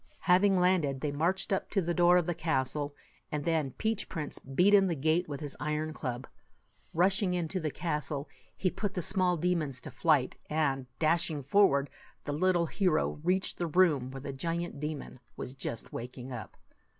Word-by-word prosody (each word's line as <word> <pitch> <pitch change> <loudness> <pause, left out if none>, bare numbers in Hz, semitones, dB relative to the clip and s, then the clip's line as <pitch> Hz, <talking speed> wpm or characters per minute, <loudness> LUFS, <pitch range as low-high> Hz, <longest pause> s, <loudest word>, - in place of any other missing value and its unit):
Having 190 +1 +4
landed, 170 -7 +2
they 150 - -1
marched 175 +7 0
up 190 - -1
to 200 - +1
the 175 -2 0
door 175 0 +5
of 175 - +2
the 175 - 0
castle, 145 -2 -1 0.4
and 150 -1 -2
then 160 -4 +1
Peach 220 -1 -1
Prince 155 -4 -4
beat 180 +10 +2
in 195 -1 +6
the 170 - 0
gate 155 +4 +1
with 145 0 -5
his 145 -3 -4
iron 150 +2 -2
club. 125 -4 -4 0.7
Rushing 185 +2 +2
into 175 +1 -1
the 155 -3 -1
castle, 150 -3 -3
77 - - -29
he 185 - +1
put 205 -2 -3
the 180 - -1
small 180 0 +2
demons 160 -6 0
to 150 - -7
flight; 130 +1 +2
and, 140 -4 0
dashing 160 -2 +1
forward, 140 -3 +4 0.4
the 145 - -2
little 175 +2 +2
hero 175 -4 +1
reached 185 +2 0
the 175 - 0
room 155 -6 +3
where 135 0 -7
the 140 0 -5
giant 165 +2 -3
demon 150 -3 -5 0.2
was 125 - -5
just 120 -4 -5
waking 125 +2 -7
up. 110 -5 -8
160 Hz, 185 wpm, -30 LUFS, 140-180 Hz, 0.7 s, in